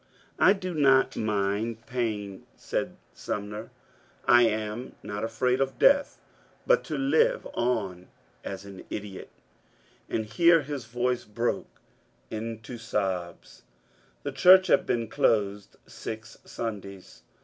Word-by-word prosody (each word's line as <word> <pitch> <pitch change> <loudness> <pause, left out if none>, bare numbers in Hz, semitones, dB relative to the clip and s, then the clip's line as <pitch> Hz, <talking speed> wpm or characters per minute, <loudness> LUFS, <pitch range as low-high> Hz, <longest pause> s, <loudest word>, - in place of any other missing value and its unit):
^' - - -35 0.4
I - - +7
do 185 -3 -5
not 135 -4 +4
mind 110 +2 -1
pain,'* 110 -7 -3
said - - -3 0.2
Sumner; 105 +1 -5
'^ - - -22 0.6
I 120 0 +7
am 110 +3 -3
not 105 +1 -5
afraid 125 +3 0
of 135 0 -1
death, 285 0 +4 0.5
but - - +4
to - - -3
lire 465 - +3
on 100 -7 -1 0.4
as 95 0 -6
an 100 -2 -10
idiot 100 -2 -6 0.3
" - - -36
— - - -34
and 110 - -1
here 165 +7 +4
his 140 -4 -5
voice 120 +2 -1
broke 115 +3 -3 0.5
into 115 +2 -6
sobs. 95 -6 -3 0.6
The 145 - -3
church 185 +8 +7
had - - +3
been 115 -1 0
closed 105 -2 0
six 110 0 -8
Sundays. 100 -4 -7
115 Hz, 130 wpm, -27 LUFS, 105-135 Hz, 0.6 s, I